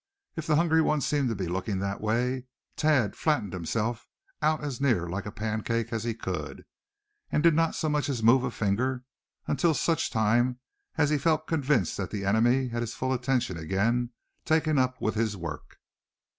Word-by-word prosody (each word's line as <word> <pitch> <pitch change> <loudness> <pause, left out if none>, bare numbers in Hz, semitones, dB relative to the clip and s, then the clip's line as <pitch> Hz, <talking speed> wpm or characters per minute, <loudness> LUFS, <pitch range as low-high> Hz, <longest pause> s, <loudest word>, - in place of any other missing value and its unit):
If 165 -1 -5
the 155 - +3
hungry 160 0 +4
one 155 -1 +2
seemed 140 -2 +1
to 115 - -1
be 95 -2 -3
looking 95 +3 -2
that 100 +1 -3
way, 125 +4 0 0.3
Thad 145 -10 +2
flattened 145 - 0
himself 105 +6 -2 0.3
out 155 0 +1
as 140 -3 -4
near 115 -11 +2
like 95 +4 -4
a - - -5
pancake 110 +2 -2
as 110 -1 -2
he 115 -1 -2
could, - - -5 0.7
and 150 - +1
did 170 -1 +6
not 165 +1 +2
so 160 - -1
much 150 -1 0
as 120 -5 -2
move 125 +3 +6
a 125 - 0
finger 125 +4 -1 0.4
until 160 +2 +2
such 165 +1 +1
time 120 +3 +2 0.4
as 150 - +3
he 150 - +2
felt 155 +1 +1
convinced 150 -5 +1
that 95 -2 -3
the 100 -2 -4
enemy 120 +6 +3
had 120 0 -3
his 120 -1 -4
full 130 0 -1
attention 125 -7 0
again 105 +9 0 0.3
taken 155 -2 +2
up 130 0 0
with 110 - 0
his 110 -2 -1
work. 85 -4 -7
120 Hz, 185 wpm, -28 LUFS, 105-145 Hz, 0.7 s, did